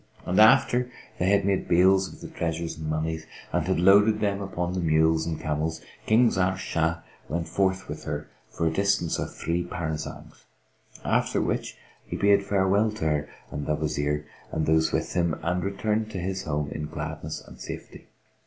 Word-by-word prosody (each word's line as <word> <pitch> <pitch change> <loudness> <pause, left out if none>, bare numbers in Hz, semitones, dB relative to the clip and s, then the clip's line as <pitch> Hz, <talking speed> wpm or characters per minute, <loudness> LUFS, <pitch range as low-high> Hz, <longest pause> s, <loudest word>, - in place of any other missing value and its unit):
And 90 - +1
after 120 +3 +5 0.3
they 90 - +2
had 100 -1 +3
made 100 -1 +1
bales 95 +2 +4
of - - -14
the - - -6
treasures 85 0 -2
and 80 -1 -5
monies, 80 0 -2 0.3
and 90 -1 0
had 95 -2 +1
loaded 100 +4 +6
them 100 -1 0
upon 90 -2 -3
the 95 - -1
mules 80 -1 +3
and 80 -2 -3
camels, 80 +1 -2 0.3
King 115 +2 +5
Zahr 95 0 +1
Shah 80 -2 -1 0.3
went 85 +1 -2
forth 95 -1 0
with 75 - -7
her 75 0 -4 0.2
for 85 - -2
a 80 - +2
distance 100 -3 +1
of - - -3
three 85 +2 -1
parasangs; 80 -3 -6 0.6
after - - +1
which - - -2 0.3
he - - -5
bade 100 0 +4
farewell 100 +2 +2
to 105 - -4
her 75 -2 0 0.2
and 75 - -4
the 75 - +2
Wazir 75 -1 -1 0.3
and 80 - 0
those 80 0 +3
with - - -1
him, 85 -3 0
and 90 +1 0
returned 105 +2 -1
to 105 - -6
his 95 +1 -3
home 75 -1 -2
in 75 0 -4
gladness - - -5
and - - -13
safety. - - -8
85 Hz, 180 wpm, -26 LUFS, 80-100 Hz, 0.6 s, loaded